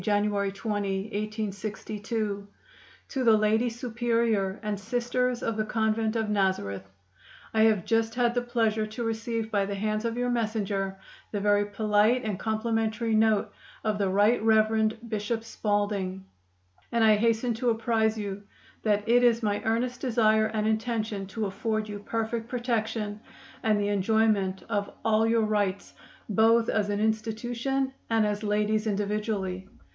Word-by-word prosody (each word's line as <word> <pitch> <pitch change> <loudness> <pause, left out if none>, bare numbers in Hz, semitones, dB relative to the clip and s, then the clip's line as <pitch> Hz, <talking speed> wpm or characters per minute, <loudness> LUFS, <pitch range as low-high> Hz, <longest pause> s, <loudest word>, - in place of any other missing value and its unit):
January 205 -1 +1
20, 200 -2 -2
1862. 210 0 -3 0.6
"To 265 -3 -2
the 225 -2 +6
Lady 220 +3 +2
Superior 230 -4 0
and 210 -2 -2
Sisters 245 +3 -1
of 225 -1 -1
the 215 - +1
Convent 220 0 0
of 220 -1 0
Nazareth: 185 - -1 0.6
I 220 - +3
have 215 -5 +2
just 225 0 +1
had 240 -1 +2
the 245 - +1
pleasure 225 -3 0
to 220 +3 -5
receive 225 0 -2
by 200 -2 +1
the 200 - -3
hands 215 +2 -1
of 230 0 -2
your 245 0 0
messenger 205 -4 -1 0.3
the 205 - -2
very 205 0 +3
polite 215 +3 +2
and 210 -4 -3
complimentary 225 +1 -1
note 220 -1 +3 0.3
of 215 -1 0
the 195 -2 +1
Right 205 +5 +3
Rev. 220 0 +3
Bishop 220 +1 -2
Spalding, 205 -4 -2 0.7
and 235 -1 +2
I 215 -1 +6
hasten 230 +2 +1
to 240 +2 0
apprise 225 -1 +1
you 200 -1 -4 0.4
that 210 0 +1
it 245 +2 +5
is 235 -1 +4
my 205 -1 0
earnest 245 +3 0
desire 220 -3 +3
and 215 -1 -1
intention 220 -3 -1
to 215 +2 -3
afford 215 +2 -2
you 205 -1 -6
perfect 225 +2 -3
protection 225 -4 -2 0.4
and 215 -2 +2
the 205 0 0
enjoyment 205 -1 +1
of 205 -2 -1 0.2
all 220 0 +3
your 225 0 +3
rights 205 -2 -1 0.3
both 225 +2 +4
as 210 -1 +1
an 205 0 -1
institution 235 +5 -1 0.2
and 225 -1 +3
as 210 0 -1
ladies 210 +1 0
individually. 200 -2 -2
215 Hz, 150 wpm, -27 LUFS, 205-230 Hz, 0.7 s, the